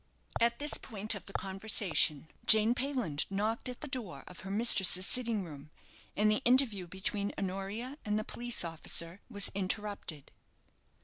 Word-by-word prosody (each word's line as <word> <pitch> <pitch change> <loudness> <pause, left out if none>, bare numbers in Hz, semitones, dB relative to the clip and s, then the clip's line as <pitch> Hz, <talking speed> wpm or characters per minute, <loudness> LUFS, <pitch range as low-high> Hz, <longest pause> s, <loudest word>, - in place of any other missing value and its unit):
At 235 0 +2
this 295 +1 -1
point 215 -2 -1
of 200 -4 -8
the 195 - -9
conversation 190 -6 +1 0.2
Jane 220 +1 +6
Payland 250 - -2
knocked 215 +5 -2
at 250 - -8
the 300 - -5
door 250 -10 -4
of 180 - -12
her 190 - -8
mistress's 195 -3 +5
sitting 230 -4 +2
room, 150 -3 -10 0.5
and 215 +1 +4
the 215 - +1
interview 240 -7 +3
between 200 +3 -2
Honoria 200 +8 -4
and 210 0 -1
the 215 - -1
police 240 -3 -1
officer 165 +2 -1
was 205 -4 +2
interrupted. 195 -6 -4
205 Hz, 150 wpm, -32 LUFS, 185-235 Hz, 0.5 s, Jane